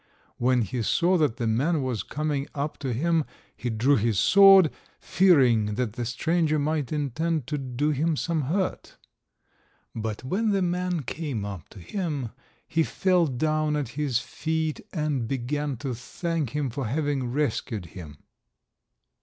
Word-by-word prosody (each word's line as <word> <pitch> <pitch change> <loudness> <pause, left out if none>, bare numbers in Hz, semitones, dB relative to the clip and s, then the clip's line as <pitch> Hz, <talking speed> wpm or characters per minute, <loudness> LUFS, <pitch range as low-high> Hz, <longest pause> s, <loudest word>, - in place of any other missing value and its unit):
When 125 0 +2
he 120 +4 -3
saw 175 +10 +2
that 140 -6 +1
the 120 - -2
man 135 +8 +1
was 125 -5 -2
coming 150 -2 -2
up 145 +1 -3
to 135 -3 -3
him, 160 +6 +1 0.3
he 125 - -4
drew 120 +6 +3
his 110 -1 +1
sword, 195 - +7 0.3
fearing 125 - +3
that 120 -3 -2
the 120 +1 -4
stranger 155 +5 +1
might 150 -2 -1
intend 155 +1 -1
to 150 +3 -3
do 135 +3 -1
him 155 +3 +1
some 160 -1 -1
hurt. 185 +7 -2 1.0
But 110 0 -4
when 200 - 0
the 195 -2 +2
man 180 -2 -1
came 130 -6 -4
up 100 -5 -7
to 100 - -13
him, 145 - -3 0.4
he 165 - +1
fell 180 +1 +2
down 155 +3 0
at 145 -5 -2
his 140 -2 -1
feet, 160 +4 -2
and 150 - -1
began 140 +2 -2
to 135 +1 -4
thank 155 +4 -3
him 145 -4 -1
for 130 0 -3
having 140 -1 -1
rescued 115 -7 -1
him. 80 -6 -9
145 Hz, 155 wpm, -26 LUFS, 120-160 Hz, 1.0 s, sword